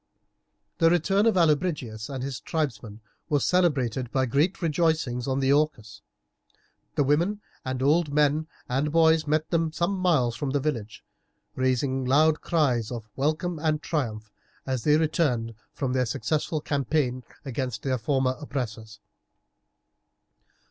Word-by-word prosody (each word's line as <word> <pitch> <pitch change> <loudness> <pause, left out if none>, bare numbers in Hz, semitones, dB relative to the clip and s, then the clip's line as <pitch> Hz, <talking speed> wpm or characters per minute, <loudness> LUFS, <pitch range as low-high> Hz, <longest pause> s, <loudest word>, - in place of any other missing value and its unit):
The 165 -1 +5
return 195 +5 +2
of 225 - +3
Allobrigius 150 -10 0
and 135 -2 -4
his 135 -3 -4
tribesmen 115 -9 -3 0.3
was 145 -3 +2
celebrated 130 -9 +1
by 130 -1 +1
great 145 +10 +1
rejoicings 160 -6 0
on 135 0 0
the 135 +1 +3
Orcus. 140 -8 -1 0.9
The 145 - +3
women 170 +9 +1 0.2
and 130 0 -3
old 150 +2 +3
men 150 +1 +2 0.2
and 135 +4 0
boys 160 -1 +4
met 155 +1 0
them 165 -2 +1
some 170 +4 -1
miles 150 -11 +2
from 140 +3 -3
the 140 +2 +1
village, 120 -8 -4 0.5
raising 130 +1 0
loud 150 +4 +3
cries 130 -10 +1
of 115 -3 -6
welcome 155 +4 -1
and 155 -1 +1
triumph 110 -10 -3 0.3
as 130 -3 -2
they 150 0 +5
returned 145 -8 0 0.2
from 130 -3 -2
their 130 -1 +1
successful 150 +7 -1
campaign 140 -3 -1 0.2
against 130 -2 -3
their 130 -2 0
former 130 +1 +1
oppressors. 110 -7 -5
140 Hz, 135 wpm, -26 LUFS, 125-160 Hz, 0.9 s, The